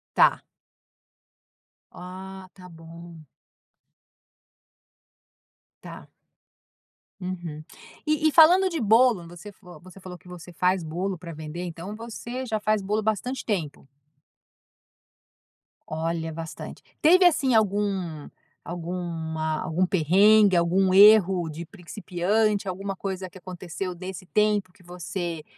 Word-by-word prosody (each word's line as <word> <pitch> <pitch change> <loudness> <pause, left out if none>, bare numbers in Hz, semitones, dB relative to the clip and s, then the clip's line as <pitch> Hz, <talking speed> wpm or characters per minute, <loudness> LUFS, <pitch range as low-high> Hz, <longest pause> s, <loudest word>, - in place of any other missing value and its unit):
Tá. - - +5 1.5
Ah, 190 +1 -10
tá 180 -2 -13
bom. 165 -1 -13 2.6
Tá. - - -11 1.1
Uhum. 175 -4 -6 0.4
E 305 +1 +2
e - - -1
falando 355 +5 +6
de 335 -3 -4
bolo, 225 -4 +3
você 175 +4 -11
vo 180 -5 -13
você 185 +2 -15
falou 180 -1 -10
que 180 - -19
você 180 -1 -11
faz 180 +2 +1
bolo 180 +5 -3
pra 170 0 -9
vender, 155 +2 -7
então, 175 +4 -7
você 235 +3 -7
já 220 -3 -2
faz 215 -1 0
bolo 210 +3 -1
bastante 220 +5 -2
tempo? 165 -11 -3 2.0
Olha, 160 +1 -3
bastante. 165 0 -8 0.2
Teve 360 +4 +6
assim 285 -7 +3
algum 195 -7 0 0.4
alguma 165 -2 -4
algum 180 0 0
perrengue? 195 +4 +4
Algum 185 +2 +2
erro 195 -4 +6
de 165 +3 -8
principiante? 200 +3 -1
Alguma 195 +1 -4
coisa 190 -1 -5
que 185 - -14
aconteceu 180 0 -6
desse 185 0 -8
tempo 210 -1 +1
que 180 - -23
você 175 -2 -6
185 Hz, 115 wpm, -25 LUFS, 170-210 Hz, 2.6 s, falando